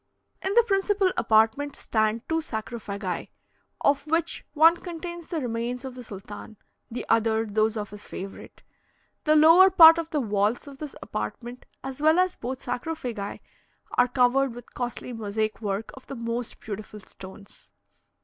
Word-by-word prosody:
In 385 +2 -1
the 475 - +7
principal 395 -2 +2
apartment 225 +6 +2
stand 220 +1 -1
two 325 0 0
sarcophagi, 215 - -5 0.5
of 280 +1 +2
which 330 +1 0
one 325 +3 +6
contains 345 -1 -7
the 335 - -2
remains 245 +1 -3
of 260 - -6
the 250 0 -9
sultan, 205 +1 -10 0.3
the 235 - -5
other 225 0 +2
those 215 +1 +1
of 210 -2 -5
his 205 0 -9
favourite. 195 +1 -9 0.6
The 305 0 +4
lower 330 +5 +8
part 330 -2 +9
of 330 -1 -4
the 305 - 0
walls 210 -1 0
of 280 -2 -12
this 300 -2 -7
apartment, 240 - -6 0.2
as 270 +1 -6
well 315 +2 +5
as 365 0 +2
both 255 +2 -6
sarcophagi, 245 -5 -4 0.5
are 245 - +3
covered 250 0 +2
with 245 - -12
costly 245 0 -4
mosaic 215 0 -2
work 205 0 -3
of 260 - -14
the 275 - -6
most 235 0 -4
beautiful 210 0 -7
stones. 195 0 -13
245 Hz, 155 wpm, -26 LUFS, 220-310 Hz, 0.6 s, part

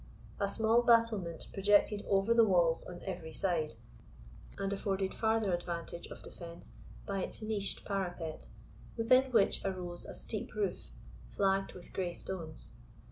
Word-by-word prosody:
A 200 - +2
small 225 +3 +3
battlement 230 -8 +3
projected 205 +1 +3
over 195 +3 +4
the 230 0 +7
walls 175 -5 +3
on 175 -1 -8
every 175 -4 -5
side, 165 -8 0 0.8
and 195 0 -1
afforded 195 -1 -1
farther 220 -3 +1
advantage 170 -1 -4
of - - -10
defence 170 -1 -10 0.3
by 195 -1 -2
its 215 - -5
niched 215 -2 -1
parapet, 175 -5 -3 0.5
within 255 +3 +4
which 220 -5 +3
arose 180 -3 -4
a - - -7
steep - - -5
roof, 410 - -2 0.4
flagged 195 -1 +1
with 180 - -12
grey 180 -2 -1
stones. 165 -5 -4
195 Hz, 135 wpm, -33 LUFS, 175-215 Hz, 0.8 s, the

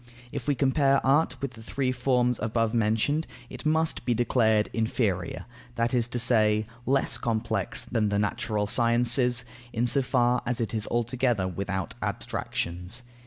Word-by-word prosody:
If - - -6
we 145 - +2
compare 135 0 +3
Art 145 +4 +2
with 140 - -2
the 110 - -13
three 130 +3 -2
forms 125 -1 +1
above 115 0 0
mentioned, 115 +8 +1 0.2
it - - -5
must 160 +1 +1
be 120 - +1
declared 110 -3 +2
inferior, 110 -6 -1 0.3
that 115 +1 0
is 120 -2 +2
to 125 - -3
say, 110 -3 +3 0.2
less 135 +1 +1
complex 110 -1 -1
than 110 -3 0
the 100 - 0
natural 105 +1 -1
Sciences, 120 +2 +3 0.3
in 115 +1 0
so 140 +3 +3
far 125 -1 +2
as 120 0 -2
it 115 -1 -2
is 110 -1 0
altogether 120 -3 0
without 95 0 -3
abstractions. 90 +8 -3
120 Hz, 155 wpm, -27 LUFS, 110-125 Hz, 0.3 s, compare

